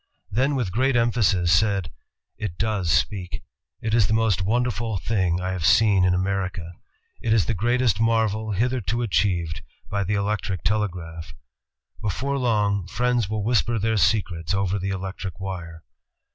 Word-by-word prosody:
Then 135 +7 +1
with 120 -9 -1
great 130 +5 +1
emphasis 110 -7 +2
said, 100 0 +2 0.4
"It 95 -5 -5
does 105 -6 -1
speak. 90 +3 -1 0.4
It 110 -1 -2
is 110 -3 +4
the 110 - +1
most 110 -4 +2
wonderful 115 +1 0
thing 95 -4 0
I 90 +1 -2
have 90 -3 -4
seen 100 0 +5
in 90 0 +3
America.... 95 -2 -2 0.5
It 110 - +1
is 110 -4 +3
the 115 - 0
greatest 120 +1 +1
marvel 110 -1 +1
hitherto 120 +2 0
achieved 90 -7 0 0.3
by 100 0 0
the 100 +2 -1
electric 100 -3 -2
telegraph.... 90 -6 -2 0.7
Before 135 +7 -1
long, 105 -6 +1
friends 120 0 0
will 110 -1 -2
whisper 120 +1 +1
their 110 +1 0
secrets 90 -3 +1
over 95 0 0
the 95 +1 -3
electric 95 -1 -5
wire!" 85 -4 -6
100 Hz, 150 wpm, -24 LUFS, 90-115 Hz, 0.7 s, seen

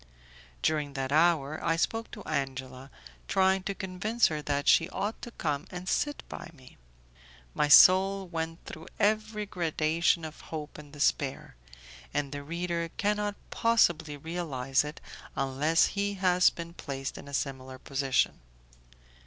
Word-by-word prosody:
During 150 -2 0
that 135 -1 -3
hour 155 -2 +2
I 165 - +2
spoke 225 +7 -1
to 210 - -10
Angela, 130 -1 -4 0.4
trying 190 0 +3
to 200 - -2
convince 190 +5 0
her 155 -1 -3
that 145 -1 -2
she 165 +2 +5
ought 210 +4 -3
to - - -6
come 150 -10 -3
and 180 0 -7
sit 290 +7 -1
by - - -8
me. 130 -3 -17 0.8
My 150 - +1
soul 190 +4 +7
went 165 -1 -5
through 160 - -9
every 215 0 +1
gradation 165 -2 +1
of 155 0 -9
hope 155 -2 -6
and 145 -1 -13
despair, 140 - -1 0.6
and 145 -2 -1
the 145 0 -5
reader 170 +2 -3
cannot 210 0 0 0.2
possibly 170 -10 +2
realize 140 -5 -1
it 150 +2 -7 0.4
unless 140 +5 +2
he 200 0 -1
has 180 -1 +4
been 170 0 -8
placed 135 -5 -5
in - - -10
a 140 - -10
similar 130 -1 -4
position. 135 0 0
160 Hz, 145 wpm, -29 LUFS, 140-190 Hz, 0.8 s, soul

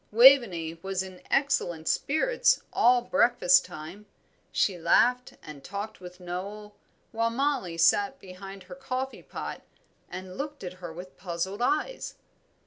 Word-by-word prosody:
Waveney 210 -10 +6
was 190 -1 -2
in 185 -1 -11
excellent 175 - 0
spirits 470 - +2
all 245 0 +4
breakfast 235 -8 +4
time. 175 +7 -10 0.4
She 195 - +1
laughed 250 +9 +3
and 150 -3 -10
talked 205 +2 -6
with 180 0 -11
Noel, 200 +4 -6 0.4
while 230 0 0
Mollie 245 -8 -1
sat 200 +9 +3
behind 195 0 -10
her 185 0 -11
coffee 255 +8 -4
pot - - -7 0.5
and 185 +1 -8
looked 290 -2 -5
at 180 -1 -5
her 175 -2 -6
with 180 +3 -10
puzzled 190 +4 -4
eyes. 390 - -1
195 Hz, 135 wpm, -28 LUFS, 180-245 Hz, 0.5 s, Waveney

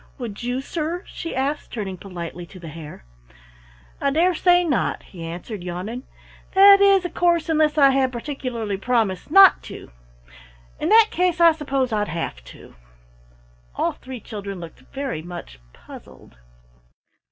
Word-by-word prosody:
Would 235 -6 -7
you, 245 +2 -2
sir?" 335 +5 -4
she 330 - -7
asked, 275 +3 -2
turning 200 -5 -4
politely 175 -2 -8
to 185 - -13
the 165 -2 -9
Hare. 150 - -10 1.0
"I 280 - +2
dare 335 +6 +2
say 355 +1 +4
not," 295 -8 -1
he 175 -4 -11
answered, 175 +4 -7
yawning. 185 +8 -6 0.5
"That 395 +1 +8
is, 395 -2 +5
of 355 - -5
course, 340 -2 +1
unless 310 -1 +2
I 275 -2 +6
had 265 -1 +1
particularly 235 -5 -4
promised 220 -2 -1
not 390 +3 +7
to. - - -10 0.9
In 315 - -1
that 445 0 +6
case 360 -1 0
I 335 -1 +7
suppose 275 -6 -2
I'd 210 -1 0
have 155 - -5
to." - - -14 1.0
All - - 0
three 260 -1 -10
children 200 -3 -7
looked 170 -5 -10
very 270 - -4
much 160 - -9
puzzled. - - -15
255 Hz, 150 wpm, -22 LUFS, -, 1.0 s, That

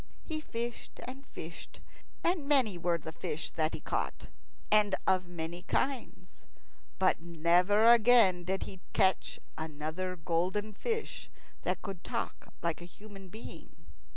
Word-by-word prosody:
He 310 -2 -3
fished 235 -4 -5
and 265 +2 -8
fished, 165 +1 -9 0.4
and 335 -5 +1
many 260 -9 +4
were 175 0 +1
the 160 0 -7
fish 160 -1 -4
that 155 0 0
he - - -7
caught, - - -2 0.4
and 210 -2 +5
of 185 -1 +3
many 170 0 -5
kinds; 265 +7 -2 0.5
but 185 -3 +3
never 175 +5 +4
again 230 -6 +7
did 190 +2 -1
he 190 -2 -9
catch 190 -3 +2 0.2
another 160 +4 -3
golden 180 +5 0
fish 450 - -3 0.3
that - - -1
could 195 -4 -6
talk - - -4
like 170 0 0
a - - -7
human 195 +1 -12
being. 220 +5 -9
190 Hz, 135 wpm, -32 LUFS, 170-225 Hz, 0.5 s, again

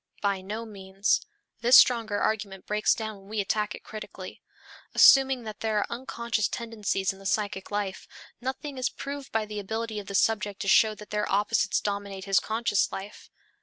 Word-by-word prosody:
By 200 -2 0
no 215 +4 -5
means; 195 -1 0 0.4
this 240 +3 +7
stronger 225 -4 +4
argument 200 -3 -2
breaks 210 0 +2
down 220 -2 -5
when 195 +1 -17
we 215 0 -3
attack 210 +1 0
it - - -13
critically. 215 -1 -9 0.5
Assuming 270 -2 +7
that 215 -1 -8
there 220 -1 0
are 205 - +2
unconscious 235 -3 -2
tendencies 210 -5 -2
in 195 - -15
the 195 - -14
psychic 200 -1 -1
life, 205 -2 -3 0.3
nothing 265 +2 -4
is 255 - +1
proved 280 0 -7
by 220 -1 0
the 210 0 -5
ability 220 +2 -3
of 200 - -9
the 200 - -5
subject 205 -1 +1
to - - -3
show 215 +2 +5
that 210 -1 -13
their 210 0 -1
opposites 205 +1 +2
dominate 200 -2 -4
his 195 -1 +4
conscious 220 -2 0
life. 195 +2 -8
210 Hz, 180 wpm, -27 LUFS, 200-225 Hz, 0.5 s, this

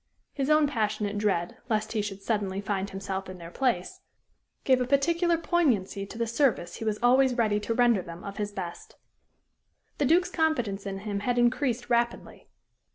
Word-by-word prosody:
His 275 0 -2
own 305 0 +5
passionate 210 -5 -1
dread 190 -5 0
lest 215 -1 0
he 220 - 0
should 200 -1 -6
suddenly 200 -4 -1
find 200 -1 -2
himself 195 0 -5
in 185 - -8
their 170 -1 -10
place, 235 -9 -1 0.6
gave 260 -1 +3
a 250 - 0
particular 335 +5 +2
poignancy 240 - 0
to 225 - -10
the 235 - 0
service 230 - 0
he - - -6
was 215 -1 0
always 255 +1 +4
ready 215 -3 +2
to 225 +2 -2
render 240 -5 +4
them 170 0 -10
of 200 0 -7
his 205 -1 -2
best. 180 -4 -7 1.0
The 285 - +2
Duke's 355 +5 +3
confidence 240 - 0
in 195 0 -5
him 205 -1 -3
had 245 +4 -1
increased 245 0 +1
rapidly. 235 0 -1
220 Hz, 175 wpm, -27 LUFS, 195-255 Hz, 1.0 s, own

